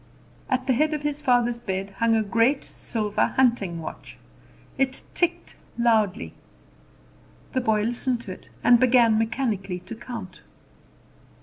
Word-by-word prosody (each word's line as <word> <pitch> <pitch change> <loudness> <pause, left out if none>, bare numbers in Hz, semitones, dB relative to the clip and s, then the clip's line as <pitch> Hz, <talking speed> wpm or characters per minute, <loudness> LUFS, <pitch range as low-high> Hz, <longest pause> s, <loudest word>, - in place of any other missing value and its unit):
At 260 -1 0
the 260 - +2
head 305 +5 +2
of 295 - -5
his 295 0 -2
father's 240 -3 +2
bed 195 -3 -4
hung 230 -1 +3
a 220 - +2
great 230 +6 +2
silver 210 -3 -1
hunting 230 -10 +2
watch. 160 - -9 0.6
It 265 -1 0
ticked 345 0 -1 0.2
loudly. 220 -5 +1 1.2
The 260 - +1
boy 220 -3 +1
listened 240 +1 -1
to 220 -6 -8
it, - - -11
and 240 -1 +6
began 235 -3 +5
mechanically 220 -5 -1
to - - -9
count. 225 -5 -8
235 Hz, 135 wpm, -25 LUFS, 215-255 Hz, 1.2 s, and